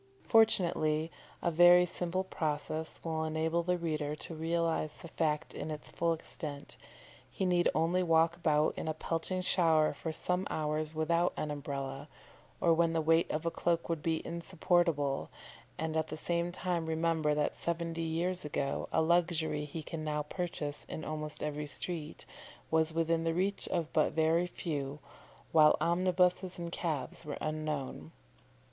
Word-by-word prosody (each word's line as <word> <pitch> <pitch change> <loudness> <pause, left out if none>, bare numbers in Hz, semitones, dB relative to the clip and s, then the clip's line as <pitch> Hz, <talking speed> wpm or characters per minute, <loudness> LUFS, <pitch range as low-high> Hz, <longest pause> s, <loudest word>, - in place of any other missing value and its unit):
Fortunately 170 -8 +3 0.3
a 170 - +2
very 175 +2 +7
simple 180 +1 -1
process 155 -2 -3
will 160 -1 -1
enable 160 +2 0
the 180 +1 0
reader 155 -3 -2
to 160 - -6
realise 165 -1 -1
the - - -11
fact 155 0 -1
in - - -5
its 150 -1 -6
full 170 0 +1
extent; 150 -3 -5 0.5
he 190 - -2
need 175 -1 +3
only 170 +3 +2
walk 165 -1 +3
about 155 -3 +2
in - - -4
a 155 - -1
pelting 165 +4 -2
shower 160 -4 +3
for 160 - -4
some 180 +4 -1
hours 155 0 -2
without 170 +3 +2
an 150 - -2
Umbrella, 140 0 -5 0.5
or 170 - +4
when 165 0 +2
the 165 - +2
weight 165 +1 +3
of 155 +2 -2
a 170 - +1
cloak 170 0 0
would 165 -2 -1
be 160 0 -1
insupportable, 170 -4 0 0.5
and 160 0 -2
at 160 0 +1
the 155 - -6
same 170 +2 -1
time 175 -2 -2
remember 160 -2 +1
that 150 0 +1
seventy 170 -1 -2
years 170 +3 -1
ago 140 -2 -2
a 160 - +3
luxury 165 -3 +1
he 155 +2 -6
can 155 +1 -5
now 150 -1 -1
purchase 150 -2 -4
in 155 - -5
almost 155 0 -5
every 150 0 -3
street, 160 0 -5 0.5
was 160 0 +3
within 165 0 +1
the 165 0 0
reach 195 +3 0
of 165 -3 -2
but 155 - +3
very 165 +2 +3
few, 145 -5 -4 0.5
while 155 -1 +6
omnibuses 180 +1 +2
and 170 -1 -5
cabs 155 -7 -3
were 150 -2 -5
unknown. 150 - -3
160 Hz, 160 wpm, -32 LUFS, 155-170 Hz, 0.5 s, very